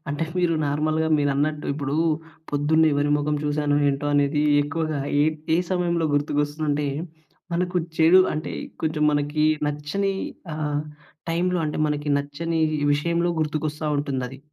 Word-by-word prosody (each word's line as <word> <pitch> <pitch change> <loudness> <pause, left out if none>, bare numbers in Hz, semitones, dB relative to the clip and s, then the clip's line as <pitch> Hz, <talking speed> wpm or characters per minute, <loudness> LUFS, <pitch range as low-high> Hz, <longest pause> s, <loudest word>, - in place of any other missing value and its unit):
అంటే 145 +3 -1
మీరు 175 -2 +2
నార్మల్‍గా 155 +2 0
మీరన్నట్టు, 145 +1 0
ఇప్పుడు 140 -1 -3 0.6
పొద్దున్నే 155 +2 +3
ఎవరి 145 +1 +1
మొఖం 150 0 0
చూశానో 145 0 +1
ఏంటో 140 +1 -1
అనేది 145 +1 +2 0.2
ఎక్కువగా 155 0 -2 0.2
ఏ - - +5 0.3
ఏ - - +4
సమయంలో 175 -2 +1
గుర్తుకొస్తుందంటే, 145 0 0 0.7
మనకు 180 +1 -1 0.2
చెడు 165 +4 +7
అంటే 155 - -4 0.3
కొంచెం 155 -1 0
మనకి 145 +1 0 0.2
నచ్చని 150 +7 -1 0.4
ఆహ్, 150 -1 -1 0.5
టైంలో 180 +2 +1
అంటే 150 - -3
మనకి 150 0 -2
నచ్చని 160 +3 -3 0.3
విషయంలో 170 +4 +1
గుర్తుకొస్తా 155 0 -2
ఉంటుందది. 135 -2 -3
150 Hz, 125 wpm, -24 LUFS, 145-160 Hz, 0.7 s, చెడు